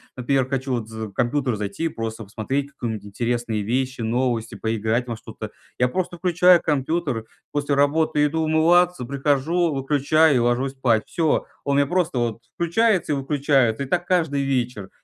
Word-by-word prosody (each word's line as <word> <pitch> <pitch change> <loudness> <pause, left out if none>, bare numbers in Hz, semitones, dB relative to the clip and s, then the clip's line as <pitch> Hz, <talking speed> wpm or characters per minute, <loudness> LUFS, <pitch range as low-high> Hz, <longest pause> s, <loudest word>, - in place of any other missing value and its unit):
например, 130 +1 0
хочу 130 0 -2
вот 115 -3 -2
за 110 -1 -6
компьютер 125 +3 0
зайти 105 +10 -4
и - - +1
просто 115 0 -5
посмотреть 135 +8 -3
какую-нибудь 110 -6 -5
интересные 115 0 -2
вещи, 130 +3 -1
новости, 115 0 -1
поиграть 110 +3 -1
во 115 -2 -4
что-то. - - -8 0.3
Я 125 - +4
просто 175 +5 -3
включаю 180 0 +4
компьютер, 145 -5 -1 0.3
после 145 -1 -1
работы 145 +1 +2
иду 160 +2 0
умываться, 165 0 +3
прихожу, 145 +5 +1
выключаю 145 +2 +3
и - - +3
ложусь 120 +3 +1
спать. 120 -5 +1
Всё. 165 -3 0 0.2
Он 140 - 0
мне 140 - +3
просто 175 -5 0
вот 115 -1 -2
включается 175 -1 +1
и - - +1
выключается, 135 -3 +1
и - - -6
так 175 +4 0
каждый 160 -6 +1
вечер. 125 -7 -2
135 Hz, 165 wpm, -23 LUFS, 120-155 Hz, 0.3 s, Я